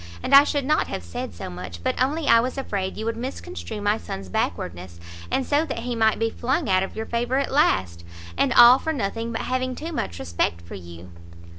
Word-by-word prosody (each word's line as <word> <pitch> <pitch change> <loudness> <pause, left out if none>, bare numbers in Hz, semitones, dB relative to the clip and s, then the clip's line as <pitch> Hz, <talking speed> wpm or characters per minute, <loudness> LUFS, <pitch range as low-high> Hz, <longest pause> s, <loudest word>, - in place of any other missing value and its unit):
And - - -2
I 280 +1 +10
should 285 -2 -1
not 305 +2 +2
have - - -5
said 85 +3 -6
so 85 - -8
much, 90 -1 -8
but - - -1
only 295 +4 0
I 230 - +7
was 255 +3 -2
afraid 200 -8 -3
you 220 - -4
would 230 0 -1
misconstrue 205 - -6
my 205 +2 +1
son's 95 -1 -7
backwardness, 85 -1 -3 0.3
and 265 - 0
so 290 +2 +2
that 275 - -5
he 240 +1 -3
might 220 -1 +3
be 225 0 0
flung 265 +7 -1
out 185 -1 +3
of 190 - -4
your 220 +1 -4
favour 240 +3 -1
at 275 - -1
last, 95 - +1 0.3
and - - +1
all 240 +2 +8
for 320 - -2
nothing 225 -2 -3
but 225 - -3
having 255 0 -2
too 320 +5 -6
much 85 - -3
respect 85 -1 -2
for 85 - -11
you." 85 0 -10
225 Hz, 225 wpm, -24 LUFS, -, 0.3 s, I